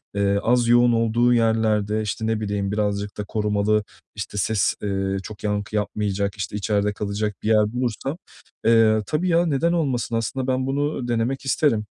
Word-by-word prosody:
eee, 100 Hz, 0 st, +2 dB
az 120 Hz, 0 st, +2 dB
yoğun 120 Hz, 0 st, +5 dB
olduğu 115 Hz, +2 st, +2 dB
yerlerde, 110 Hz, -2 st, +1 dB
işte, 110 Hz, +1 st, -3 dB
ne 110 Hz, -1 st, 0 dB
bileyim, 100 Hz, -2 st, -2 dB
birazcık 105 Hz, -1 st, -2 dB
da 105 Hz, -, -3 dB
korumalı, 105 Hz, 0 st, 0 dB, 0.3 s
işte, 105 Hz, 0 st, -6 dB
ses, 105 Hz, +1 st, +1 dB
eee, 95 Hz, -1 st, -1 dB
çok 105 Hz, -1 st, -10 dB
yankı 105 Hz, +1 st, -2 dB
yapmayacak, 100 Hz, -1 st, -1 dB
işte, 95 Hz, 0 st, -5 dB
içeride 105 Hz, 0 st, 0 dB
kalacak 105 Hz, 0 st, -3 dB
bir -, -, -2 dB
yer 105 Hz, 0 st, +3 dB
bulursam, 125 Hz, +5 st, -2 dB, 0.5 s
eee, 110 Hz, -1 st, +5 dB
tabii 175 Hz, +4 st, 0 dB
ya, 170 Hz, +1 st, +3 dB
neden 165 Hz, +2 st, +1 dB
olmasın? 130 Hz, -8 st, -1 dB
Aslında 125 Hz, +3 st, -2 dB
ben 130 Hz, 0 st, 0 dB
bunu 140 Hz, -2 st, -1 dB
denemek 120 Hz, +4 st, -1 dB
isterim. 125 Hz, -5 st, +1 dB
110 Hz, 165 wpm, -23 LUFS, 105-120 Hz, 0.5 s, yoğun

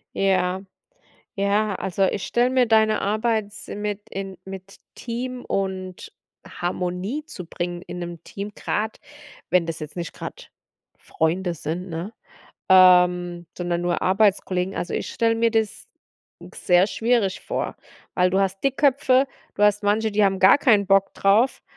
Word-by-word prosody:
Ja, 190 Hz, -1 st, +1 dB, 0.7 s
ja, 205 Hz, 0 st, +1 dB
also, 195 Hz, +1 st, -1 dB
ich 190 Hz, 0 st, -1 dB
stelle 240 Hz, +1 st, +2 dB
mir 255 Hz, -1 st, +3 dB
deine 220 Hz, -1 st, +3 dB
Arbeit 215 Hz, +1 st, 0 dB
s -, -, -12 dB
mit 210 Hz, 0 st, -5 dB
in 195 Hz, -1 st, -6 dB
mit 190 Hz, 0 st, -9 dB, 0.2 s
Team 245 Hz, +1 st, -5 dB
und 190 Hz, -2 st, -4 dB, 0.4 s
Harmonie 180 Hz, +8 st, -3 dB
zu 180 Hz, -, -8 dB
bringen 175 Hz, +1 st, -5 dB
in 180 Hz, -, -8 dB
'nem 175 Hz, -1 st, -7 dB
Team, 200 Hz, +1 st, -7 dB
grad, 220 Hz, +1 st, -2 dB, 0.5 s
wenn 180 Hz, -2 st, +3 dB
das 165 Hz, -1 st, -4 dB
jetzt 155 Hz, -1 st, -8 dB
nicht 170 Hz, -2 st, -5 dB
grad -, -, -9 dB, 0.5 s
Freunde 175 Hz, +3 st, -1 dB
sind, 170 Hz, +3 st, -5 dB
ne, 170 Hz, +7 st, -5 dB, 0.5 s
ähm, 180 Hz, -2 st, +5 dB
sondern 175 Hz, -1 st, -2 dB
nur 175 Hz, 0 st, -1 dB
Arbeitskollegen 190 Hz, -1 st, +1 dB
also, 175 Hz, -, -3 dB
ich -, -, -3 dB
stelle 230 Hz, 0 st, +1 dB
mir 230 Hz, 0 st, +2 dB
das 220 Hz, -2 st, -2 dB, 0.7 s
sehr 180 Hz, +1 st, +3 dB
schwierig 225 Hz, -3 st, 0 dB
vor, -, -, -3 dB, 0.4 s
weil 180 Hz, 0 st, +3 dB
du 190 Hz, -, +1 dB
hast 195 Hz, 0 st, -1 dB
Dickköpfe, 275 Hz, -1 st, +3 dB, 0.3 s
du 205 Hz, -, -2 dB
hast 210 Hz, 0 st, +4 dB
manche, 215 Hz, +2 st, +1 dB
die 210 Hz, 0 st, +3 dB
haben 195 Hz, -1 st, +1 dB
gar 195 Hz, +9 st, +7 dB
keinen 215 Hz, -8 st, +3 dB
Bock 195 Hz, 0 st, +3 dB
drauf, 215 Hz, +7 st, +2 dB
195 Hz, 150 wpm, -23 LUFS, 180-220 Hz, 0.7 s, gar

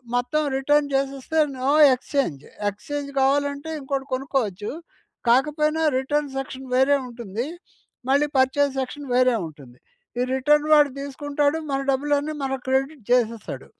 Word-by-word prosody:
మొత్తం 245 Hz, +5 st, 0 dB
రిటర్న్ 290 Hz, +2 st, +2 dB
చేసేస్తే 275 Hz, +3 st, -2 dB, 0.2 s
no 260 Hz, +2 st, 0 dB, 0.2 s
exchange, 250 Hz, -, -2 dB, 0.3 s
exchange 285 Hz, +8 st, -6 dB
కావాలంటే 285 Hz, +2 st, +1 dB
ఇంకోటి 270 Hz, -1 st, -3 dB
కొనుక్కోవచ్చు, 245 Hz, -7 st, -2 dB, 0.6 s
కాకపోయినా 300 Hz, +5 st, +2 dB, 0.2 s
రిటర్న్ 290 Hz, +2 st, -1 dB
సెక్షన్ 265 Hz, 0 st, -6 dB
వేరే 265 Hz, +2 st, +4 dB
ఉంటుంది, 235 Hz, -1 st, -5 dB, 0.6 s
మళ్ళీ 285 Hz, +2 st, +3 dB
పర్చేజ్ 275 Hz, +2 st, +3 dB
సెక్షన్ 280 Hz, +2 st, -5 dB
వేరే 255 Hz, 0 st, +4 dB
ఉంటుంది. 140 Hz, -5 st, -14 dB, 0.4 s
ఈ -, -, +2 dB
రిటర్న్ 295 Hz, +3 st, +3 dB
వాడు 295 Hz, -1 st, +6 dB
తీసుకుంటాడు 285 Hz, +2 st, -1 dB
మన 270 Hz, -, 0 dB
డబ్బులన్నీ 290 Hz, +2 st, 0 dB
మనకి 270 Hz, -1 st, -3 dB
క్రెడిట్ 270 Hz, +1 st, 0 dB
చేసేస్తాడు. 230 Hz, -3 st, 0 dB
270 Hz, 120 wpm, -23 LUFS, 255-290 Hz, 0.6 s, వాడు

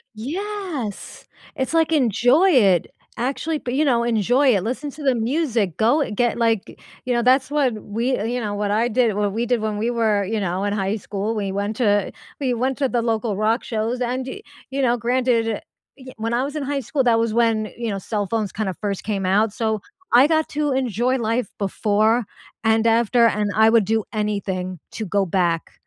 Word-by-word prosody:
Yes, 320 Hz, -, -5 dB, 0.3 s
it's, 265 Hz, +4 st, -2 dB
like, 325 Hz, 0 st, +2 dB
"Enjoy 260 Hz, -, +3 dB
it, 195 Hz, -, +4 dB, 0.3 s
actually, 285 Hz, +5 st, -2 dB
p 245 Hz, -, -5 dB
you 300 Hz, +3 st, +2 dB
know, 235 Hz, -3 st, +2 dB
enjoy 240 Hz, +3 st, +3 dB
it, 190 Hz, -, 0 dB
listen 260 Hz, +6 st, -3 dB
to 300 Hz, -, -10 dB
the 265 Hz, -2 st, +3 dB
music, 230 Hz, -, 0 dB
go 260 Hz, +7 st, +2 dB
get, 240 Hz, +3 st, 0 dB
like" 225 Hz, -3 st, 0 dB, 0.3 s
You 250 Hz, -, 0 dB
know, 240 Hz, -, +2 dB
that's 260 Hz, +3 st, +3 dB
what 285 Hz, -5 st, +2 dB
we 235 Hz, +5 st, -1 dB
you 245 Hz, +1 st, -1 dB
know, 210 Hz, -3 st, -3 dB
what 205 Hz, 0 st, -1 dB
I 220 Hz, +3 st, +2 dB
did 235 Hz, -3 st, +1 dB
what 205 Hz, -1 st, 0 dB
we 230 Hz, +2 st, -1 dB
did 240 Hz, -2 st, 0 dB
when 215 Hz, -1 st, -2 dB
we 225 Hz, +3 st, 0 dB
were, 220 Hz, -4 st, +1 dB
you 220 Hz, +2 st, -2 dB
know, 190 Hz, 0 st, -2 dB
in 205 Hz, -, 0 dB
high 195 Hz, 0 st, -1 dB
school. 210 Hz, +2 st, -3 dB
We 200 Hz, -2 st, -2 dB
went 200 Hz, +2 st, -2 dB
to 205 Hz, -5 st, +2 dB, 0.3 s
we 260 Hz, -3 st, 0 dB
went 255 Hz, +3 st, -1 dB
to 270 Hz, -3 st, +1 dB
the 240 Hz, -, 0 dB
local 225 Hz, -2 st, -1 dB
rock 220 Hz, +3 st, +1 dB
shows 230 Hz, +2 st, -2 dB
and, 250 Hz, +1 st, -1 dB
y -, -, -7 dB, 0.3 s
you 275 Hz, +1 st, -2 dB
know, 245 Hz, -2 st, +2 dB
granted, 240 Hz, -1 st, +1 dB
eh 220 Hz, -, -2 dB, 0.4 s
y 260 Hz, 0 st, -11 dB
when 225 Hz, +1 st, -2 dB
I 245 Hz, -, +1 dB
was 285 Hz, +2 st, -5 dB
in 295 Hz, -, -2 dB
high 280 Hz, 0 st, -2 dB
school 270 Hz, +3 st, -1 dB
that 230 Hz, -2 st, +3 dB
was 230 Hz, -1 st, 0 dB
when, 225 Hz, -2 st, +1 dB
you 235 Hz, -2 st, -3 dB
know, 200 Hz, -, -2 dB
cell 205 Hz, 0 st, -3 dB
phones 215 Hz, -3 st, -2 dB
kind 210 Hz, 0 st, -2 dB
of 180 Hz, -, -6 dB
first 200 Hz, -2 st, -3 dB
came 200 Hz, -3 st, -2 dB
out, 205 Hz, +3 st, +2 dB
so, 220 Hz, -2 st, -1 dB, 0.3 s
I 250 Hz, +3 st, +8 dB
got 315 Hz, -1 st, +1 dB
to 295 Hz, -1 st, -1 dB
enjoy 255 Hz, -1 st, 0 dB
life 230 Hz, -2 st, -1 dB
before 215 Hz, +3 st, +1 dB, 0.4 s
and 225 Hz, +1 st, +3 dB
after 230 Hz, +1 st, +4 dB
and 210 Hz, -1 st, 0 dB
I 220 Hz, +1 st, +5 dB
would 225 Hz, -2 st, +4 dB
do 220 Hz, +1 st, 0 dB
anything 190 Hz, -4 st, -2 dB
to 220 Hz, -, -4 dB
go 200 Hz, +1 st, +1 dB
back. 170 Hz, -2 st, 0 dB
230 Hz, 210 wpm, -22 LUFS, 210-255 Hz, 0.4 s, I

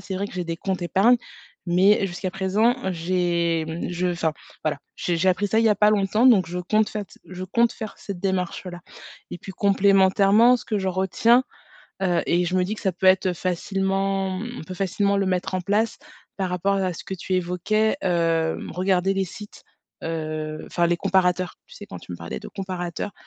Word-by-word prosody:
C'est 190 Hz, +1 st, -6 dB
vrai 195 Hz, +2 st, -2 dB
que -, -, -12 dB
j'ai 180 Hz, -1 st, -3 dB
des 165 Hz, 0 st, -4 dB
comptes 185 Hz, 0 st, -3 dB
épargne, 200 Hz, +8 st, +4 dB, 0.5 s
mais, 195 Hz, +3 st, +4 dB
jusqu'à 185 Hz, +1 st, -4 dB
présent, 195 Hz, +6 st, +1 dB, 0.2 s
j'ai 170 Hz, -1 st, 0 dB
mmh 160 Hz, +1 st, -4 dB
je 180 Hz, +1 st, -1 dB
enfin, 170 Hz, -3 st, 0 dB, 0.3 s
voilà. -, -, 0 dB, 0.2 s
J'ai 175 Hz, -, -1 dB
j'ai 180 Hz, +3 st, +2 dB
appris 195 Hz, +3 st, +2 dB
ça, 220 Hz, -, +2 dB
il -, -, +2 dB
y -, -, +5 dB
a 210 Hz, -, +4 dB
pas 210 Hz, +1 st, +5 dB
longtemps, 210 Hz, +3 st, +2 dB
donc 200 Hz, -9 st, +6 dB
je 180 Hz, +1 st, -4 dB
compte 215 Hz, +4 st, +1 dB
fait 210 Hz, -3 st, -5 dB, 0.2 s
je 185 Hz, 0 st, -8 dB
compte 235 Hz, +5 st, +2 dB
faire 215 Hz, -2 st, -7 dB
cette 195 Hz, -3 st, -7 dB
démarche-là 180 Hz, -2 st, -3 dB, 0.5 s
et 175 Hz, -, -5 dB
puis 195 Hz, -, -9 dB
complémentairement, 200 Hz, +4 st, +4 dB
ce -, -, -10 dB
que 215 Hz, -, -1 dB
je 190 Hz, -, -3 dB
retiens, 190 Hz, +7 st, +3 dB, 0.6 s
heu 180 Hz, -2 st, +2 dB
et 175 Hz, +1 st, +2 dB
je 180 Hz, -, -2 dB
me 180 Hz, -, +3 dB
dis 205 Hz, +4 st, -3 dB
que -, -, -9 dB
ça 190 Hz, -, +1 dB
peut 185 Hz, +2 st, -2 dB
être 185 Hz, -1 st, +4 dB
facilement 195 Hz, +1 st, -1 dB, 0.2 s
on -, -, -7 dB
peut 185 Hz, +3 st, -8 dB
facilement 200 Hz, +2 st, 0 dB
le 195 Hz, -1 st, +1 dB
mettre 185 Hz, 0 st, -1 dB
en 185 Hz, -, 0 dB
place 210 Hz, +5 st, 0 dB, 0.4 s
par 190 Hz, -2 st, -1 dB
rapport 195 Hz, +2 st, 0 dB
à 190 Hz, -2 st, 0 dB
ce -, -, -9 dB
que -, -, -7 dB
tu 185 Hz, +1 st, -3 dB
évoquais, 190 Hz, +6 st, +1 dB
hem, 165 Hz, -3 st, 0 dB
regarder 185 Hz, +1 st, +1 dB
les 195 Hz, -1 st, 0 dB
sites, 205 Hz, +4 st, -11 dB, 0.4 s
heu, 155 Hz, -1 st, -4 dB
enfin 175 Hz, -1 st, +1 dB
les 175 Hz, 0 st, +1 dB
comparateurs. 185 Hz, -1 st, +1 dB
Tu -, -, -15 dB
sais 205 Hz, -, -9 dB
quand 195 Hz, -, -8 dB
tu 90 Hz, -, -10 dB
me -, -, -5 dB
parlais 85 Hz, 0 st, -6 dB
de -, -, -9 dB
comparateur, 185 Hz, -1 st, -5 dB
185 Hz, 205 wpm, -24 LUFS, 175-200 Hz, 0.6 s, donc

